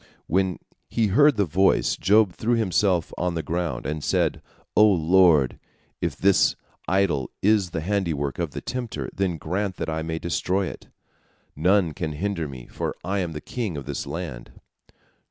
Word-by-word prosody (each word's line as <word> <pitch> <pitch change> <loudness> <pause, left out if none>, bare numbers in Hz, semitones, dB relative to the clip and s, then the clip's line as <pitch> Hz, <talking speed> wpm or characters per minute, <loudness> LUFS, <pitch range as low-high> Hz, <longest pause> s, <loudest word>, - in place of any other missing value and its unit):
When 95 0 +1 0.3
he 115 - +1
heard 145 +6 +5
the 100 - +3
voice, 95 +4 +2
Job 105 -1 +3
threw 120 +6 0
himself 95 -5 +1
on 90 -1 -1
the 80 - -2
ground, 85 -7 -2
and 75 +1 -3
said: - - +1 0.3
"O 105 - +7
Lord, 85 - +4 0.4
if - - -1
this 95 -2 +3 0.3
idol 90 -8 +1
is 105 -2 +3
the 80 - -3
handiwork 80 -7 -1
of - - -1
the - - -7
tempter, 125 -3 -4
then 95 -3 -1
grant 95 +5 -2
that - - -3
I 80 0 -2
may 80 0 -3
destroy 90 +3 -1
it. - - -8 0.7
None 90 +1 +2
can 80 0 -3
hinder 85 0 -2
me, 65 -3 -9
for - - -4
I 100 +2 -1
am 85 -3 -2
the 75 - -6
king 105 -7 -4
of 70 - -6
this - - -4
land." - - -6
90 Hz, 170 wpm, -24 LUFS, 80-100 Hz, 0.7 s, O